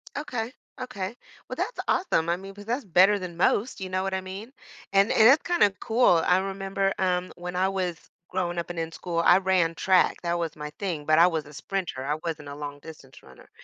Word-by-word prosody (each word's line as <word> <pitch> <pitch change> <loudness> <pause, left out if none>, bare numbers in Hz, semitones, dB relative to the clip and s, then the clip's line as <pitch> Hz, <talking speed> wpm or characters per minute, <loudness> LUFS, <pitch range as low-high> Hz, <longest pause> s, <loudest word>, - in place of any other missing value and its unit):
Okay. 250 -6 -4 0.3
Okay. 200 -4 -5 0.3
Well, - - -4
that's - - -3
awesome, 170 - +1
I 170 - +1
mean, 195 +1 -10
'cause 205 +1 -12
that's 240 +2 -2
better 190 +3 +5
than 180 -3 -7
most. 200 +5 +1
You 185 - -4
know 185 0 -1
what 195 0 -2
I 190 - -1
mean? 195 +6 -8 0.4
And 195 +2 +4
and 220 - +6
it's 275 +5 +6
kinda 345 - +3
cool. 225 -8 +3
I 180 - +4
remember, 195 0 -1
um, 180 -1 0
when 180 0 -6
I 185 +1 +2
was 180 -4 -2 0.3
growing 175 -2 -2
up 170 - -5
and 175 - -6
in 165 0 -3
school, 170 0 -3
I 175 - +7
ran 185 -3 +2
track. 185 +2 +2
That 170 0 -1
was 165 -2 -3
my 150 0 -6
thing, 170 -7 -3
but 155 0 +4
I 170 - +8
was 160 -4 -2
a 150 - -14
sprinter. 165 -5 -4
I 150 - 0
wasn't 150 -3 -4
a 140 - -7
long-distance 145 -1 -10
runner, 65 -1 -17
185 Hz, 220 wpm, -26 LUFS, 165-195 Hz, 0.4 s, I